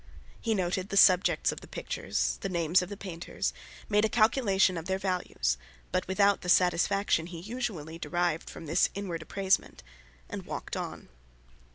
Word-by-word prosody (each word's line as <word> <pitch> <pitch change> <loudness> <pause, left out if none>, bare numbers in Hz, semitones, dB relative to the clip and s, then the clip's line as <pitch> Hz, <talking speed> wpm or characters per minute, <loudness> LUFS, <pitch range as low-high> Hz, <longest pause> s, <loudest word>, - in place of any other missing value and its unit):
He 225 -2 0
noted 185 +1 -1
the 200 - -1
subjects 185 -1 +5
of - - -8
the - - -12
pictures, - - -2
the 195 - -2
names 170 0 +2
of 180 - -5
the 205 - -6
painters, 175 -4 -4 0.3
made 210 0 +3
a 220 - +3
calculation 215 -5 +3
of 165 -1 -5
their 190 0 0
values, 180 - -1 0.3
but 185 - 0
without 200 +1 +3
the 180 - -5
satisfaction 180 -1 +3
he 175 -2 -8
usually 185 -7 -5
derived 175 -2 -1
from 165 - -9
this 160 +4 +3
inward 185 -5 -4
appraisement, 190 - 0 0.4
and - - -6
walked - - -5
on. - - -6
185 Hz, 165 wpm, -29 LUFS, 170-200 Hz, 0.4 s, subjects